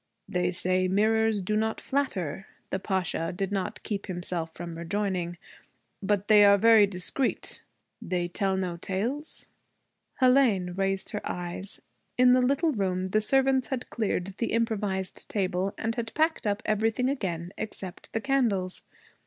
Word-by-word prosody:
'They 180 Hz, -2 st, 0 dB
say 185 Hz, +1 st, +1 dB
mirrors 215 Hz, +1 st, +2 dB
do 210 Hz, +4 st, 0 dB
not 220 Hz, +1 st, 0 dB
flatter,' 195 Hz, -, -2 dB, 0.2 s
the 190 Hz, -, 0 dB
Pasha 185 Hz, -4 st, -1 dB
did 195 Hz, +2 st, -3 dB
not 195 Hz, -2 st, -3 dB
keep 205 Hz, -3 st, -3 dB
himself 175 Hz, -3 st, -3 dB
from 170 Hz, 0 st, -7 dB
rejoining, 175 Hz, 0 st, -2 dB, 0.6 s
'but 205 Hz, 0 st, 0 dB
they 210 Hz, -1 st, +7 dB
are 200 Hz, 0 st, +7 dB
very 220 Hz, 0 st, +6 dB
discreet. 195 Hz, +7 st, -2 dB, 0.4 s
They 175 Hz, -1 st, -1 dB
tell 190 Hz, +2 st, 0 dB
no 180 Hz, -2 st, -2 dB
tales?' 235 Hz, -, -3 dB, 0.7 s
Hélène 250 Hz, -9 st, +4 dB
raised 195 Hz, 0 st, -1 dB
her 210 Hz, -, -3 dB
eyes. 180 Hz, +2 st, -5 dB, 0.3 s
In 250 Hz, 0 st, +6 dB
the 255 Hz, 0 st, +5 dB
little 280 Hz, +6 st, +2 dB
room 190 Hz, -5 st, -1 dB
the 215 Hz, +3 st, +2 dB
servants 265 Hz, +2 st, +2 dB
had 255 Hz, -2 st, -4 dB
cleared 210 Hz, -5 st, -1 dB
the 230 Hz, -, -1 dB
improvised 205 Hz, -5 st, -1 dB
table 190 Hz, -1 st, 0 dB
and 225 Hz, 0 st, -1 dB
had 230 Hz, -1 st, -5 dB
packed 315 Hz, -6 st, +1 dB
up 205 Hz, +1 st, -1 dB
everything 220 Hz, +4 st, +1 dB
again 185 Hz, -9 st, -3 dB
except 190 Hz, -4 st, -7 dB
the 225 Hz, -, -2 dB
candles. 220 Hz, -9 st, 0 dB
200 Hz, 145 wpm, -28 LUFS, 185-225 Hz, 0.7 s, they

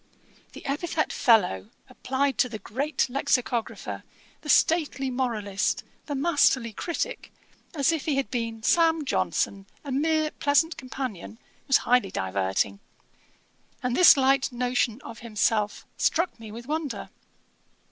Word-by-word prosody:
The -, -, -11 dB
epithet 310 Hz, +3 st, -1 dB
fellow, 180 Hz, -, +3 dB, 0.2 s
applied 265 Hz, +1 st, -2 dB
to 250 Hz, -, +3 dB
the 220 Hz, -, -5 dB
great 270 Hz, +10 st, -1 dB
Lexicographer, 245 Hz, -2 st, -1 dB, 0.4 s
the 300 Hz, -, -9 dB
stately 290 Hz, -4 st, +2 dB
Moralist, 220 Hz, -6 st, -1 dB, 0.2 s
the 290 Hz, -, -3 dB
masterly 270 Hz, -6 st, +2 dB
Critick, 350 Hz, -, -4 dB, 0.4 s
as 280 Hz, 0 st, +3 dB
if 320 Hz, -3 st, -2 dB
he 300 Hz, -, +1 dB
had 275 Hz, -1 st, -1 dB
been 230 Hz, -3 st, -3 dB
Sam 325 Hz, +1 st, +3 dB
Johnson, 200 Hz, -7 st, -1 dB, 0.2 s
a 285 Hz, -, -6 dB
mere 310 Hz, +3 st, +1 dB
pleasant 310 Hz, +3 st, +2 dB
companion, 250 Hz, -, -6 dB, 0.3 s
was 270 Hz, -, +6 dB
highly 245 Hz, -4 st, +3 dB
diverting; 95 Hz, -, -1 dB, 1.0 s
and 250 Hz, -1 st, 0 dB
this 360 Hz, -5 st, +8 dB
light 270 Hz, 0 st, +3 dB
notion 245 Hz, -1 st, 0 dB
of 230 Hz, -, -9 dB
himself 215 Hz, -2 st, 0 dB
struck 335 Hz, -5 st, +1 dB
me 220 Hz, -2 st, -9 dB
with 235 Hz, +2 st, -9 dB
wonder. 300 Hz, -1 st, -4 dB
260 Hz, 125 wpm, -26 LUFS, 225-290 Hz, 1.0 s, this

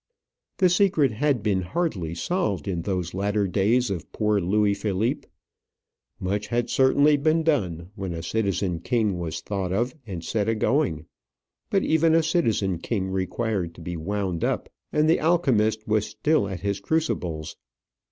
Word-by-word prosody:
The 185 Hz, -, +5 dB
secret 175 Hz, -, +3 dB
had 130 Hz, 0 st, 0 dB
been 100 Hz, -3 st, +1 dB
hardly 90 Hz, -, -2 dB
solved 100 Hz, -, -1 dB
in 90 Hz, -3 st, -1 dB
those 90 Hz, -2 st, -2 dB
latter 100 Hz, +1 st, 0 dB
days 110 Hz, +5 st, +2 dB
of 90 Hz, -5 st, -5 dB
poor 105 Hz, -2 st, +1 dB
Louis 100 Hz, +3 st, +2 dB
Philippe. 100 Hz, +2 st, -1 dB, 0.9 s
Much 100 Hz, +3 st, -2 dB
had 120 Hz, 0 st, -1 dB
certainly 140 Hz, +3 st, +4 dB
been 155 Hz, +3 st, +2 dB
done 95 Hz, -, 0 dB
when 95 Hz, -3 st, -5 dB
a 85 Hz, -1 st, -5 dB
citizen 100 Hz, -3 st, -1 dB
king 105 Hz, -1 st, 0 dB
was 85 Hz, -2 st, -4 dB
thought 95 Hz, -3 st, -3 dB
of 120 Hz, +6 st, 0 dB
and 90 Hz, -5 st, -5 dB
set 105 Hz, +5 st, 0 dB
agoing; 115 Hz, -, +1 dB, 0.6 s
but 195 Hz, -, +2 dB
even 160 Hz, +1 st, +3 dB
a 165 Hz, -, +4 dB
citizen 110 Hz, -, +1 dB
king 95 Hz, -1 st, -2 dB
required 95 Hz, -1 st, -2 dB
to -, -, -12 dB
be 85 Hz, +1 st, -5 dB
wound 95 Hz, 0 st, -2 dB
up, -, -, -1 dB, 0.2 s
and 150 Hz, +1 st, +2 dB
the 165 Hz, -, +4 dB
alchemist 115 Hz, -11 st, +2 dB
was 105 Hz, -1 st, +1 dB
still 130 Hz, 0 st, +1 dB
at 95 Hz, -3 st, -5 dB
his 100 Hz, 0 st, -1 dB
crucibles. 90 Hz, -, -2 dB
105 Hz, 155 wpm, -25 LUFS, 95-135 Hz, 0.9 s, The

